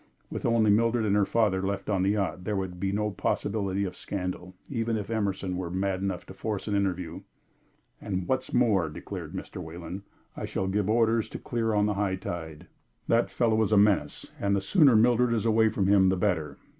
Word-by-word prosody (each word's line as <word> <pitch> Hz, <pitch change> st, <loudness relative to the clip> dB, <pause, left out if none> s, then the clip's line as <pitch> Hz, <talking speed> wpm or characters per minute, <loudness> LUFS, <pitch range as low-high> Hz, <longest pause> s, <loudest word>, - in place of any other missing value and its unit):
With -, -, -2 dB
only 115 Hz, -2 st, +4 dB
Mildred 115 Hz, +2 st, +2 dB
and 100 Hz, -1 st, +2 dB
her 105 Hz, -1 st, +3 dB
father 105 Hz, -5 st, +2 dB
left 100 Hz, 0 st, -3 dB
on 100 Hz, -3 st, +1 dB
the 95 Hz, -, +2 dB
yacht, 100 Hz, -3 st, -1 dB
there 105 Hz, +2 st, -2 dB
would 95 Hz, -2 st, -4 dB
be 95 Hz, +1 st, -1 dB
no 105 Hz, +1 st, -1 dB
possibility 100 Hz, +1 st, -1 dB
of 90 Hz, -1 st, -5 dB
scandal, 90 Hz, -2 st, -5 dB
even 115 Hz, -3 st, -1 dB
if 105 Hz, +1 st, -5 dB
Emerson 100 Hz, -4 st, -1 dB
were 90 Hz, -2 st, -3 dB
mad 95 Hz, +1 st, -1 dB
enough 95 Hz, -2 st, -3 dB
to -, -, -10 dB
force 105 Hz, +1 st, -4 dB
an 105 Hz, -, -1 dB
interview. 95 Hz, -3 st, -2 dB, 0.8 s
"And 95 Hz, -2 st, -3 dB
what 130 Hz, -, +1 dB
is -, -, -13 dB
more," 105 Hz, -10 st, +2 dB
declared 75 Hz, -, -7 dB
Mr. -, -, -6 dB
Wayland, 85 Hz, +3 st, -7 dB, 0.3 s
"I -, -, -4 dB
shall 95 Hz, -, -2 dB
give 100 Hz, +1 st, 0 dB
orders 115 Hz, 0 st, +2 dB
to -, -, -6 dB
clear 115 Hz, -2 st, -1 dB
on 105 Hz, 0 st, +3 dB
the 105 Hz, -, +1 dB
high 100 Hz, -1 st, 0 dB
tide. 80 Hz, -4 st, -6 dB, 0.4 s
That 115 Hz, +1 st, +2 dB
fellow 110 Hz, -2 st, +1 dB
is 110 Hz, -, +1 dB
a 105 Hz, -, +5 dB
menace, 100 Hz, -8 st, +2 dB
and 100 Hz, 0 st, +1 dB
the -, -, +2 dB
sooner 140 Hz, -, +5 dB
Mildred 120 Hz, +1 st, +4 dB
is 110 Hz, -, -1 dB
away 110 Hz, 0 st, +4 dB
from 105 Hz, -3 st, -1 dB
him 95 Hz, -1 st, +5 dB
the 95 Hz, -, +1 dB
better. 80 Hz, -7 st, -1 dB
100 Hz, 210 wpm, -27 LUFS, 95-110 Hz, 0.8 s, a